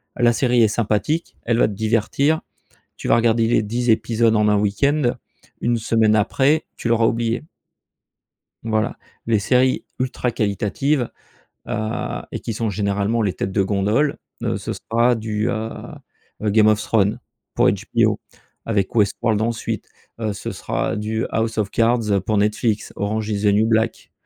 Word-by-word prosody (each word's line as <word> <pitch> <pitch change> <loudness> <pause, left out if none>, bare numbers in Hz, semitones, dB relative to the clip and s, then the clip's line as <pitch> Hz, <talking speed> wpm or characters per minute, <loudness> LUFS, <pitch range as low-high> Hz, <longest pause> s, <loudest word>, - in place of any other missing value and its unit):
La 120 -1 +4
série 120 +1 +2
est - - +5
sympathique, 110 +9 -1
elle 115 0 +1
va - - +5
te 105 - -5
divertir. 115 +9 +1 0.6
Tu - - -6
vas - - +5
regarder 115 -1 +3
les 115 -1 +2
10 120 +3 -2
épisodes 115 0 +3
en 105 0 +3
1 105 - +3
week-end, 120 +7 +1 0.5
1 120 0 +1
semaine 110 -1 +2
après, 135 +8 +2
tu - - -3
l'auras 115 -1 +3
oubliée. 115 +2 -1 1.2
Voilà. 110 -1 -1 0.3
Les 115 -2 +2
séries 130 +5 +2
ultra 125 -1 -1
qualitatives, 115 +5 0 0.6
heu, 110 +1 -3
et - - -4
qui 115 - -4
sont 110 +1 -2
généralement 100 +3 0
les 100 -3 +1
têtes 95 - -4
de 100 0 +2
gondole, 105 +9 +1 0.2
heu, - - -1
ce - - -4
sera 120 +2 +1
du, 110 0 -2
heu, 110 -2 -2 0.7
Game 105 0 +4
of 110 0 +4
Thrones 105 -2 +1 0.4
pour - - +4
HBO - - 0 0.5
avec 105 -4 0
Westworld 110 0 +1
ensuite. 115 +1 -2 0.3
Heu, 110 -2 -1
ce - - -5
sera - - -2
du 110 +2 -2
House 110 0 -1
of 105 -2 -1
Cards 115 -4 +2
pour 110 - +1
Netflix, 105 +1 0
Orange 110 +2 -2
is 100 -1 -1
the - - +3
New 105 +2 +3
Black, 110 0 0
110 Hz, 160 wpm, -21 LUFS, 105-120 Hz, 1.2 s, est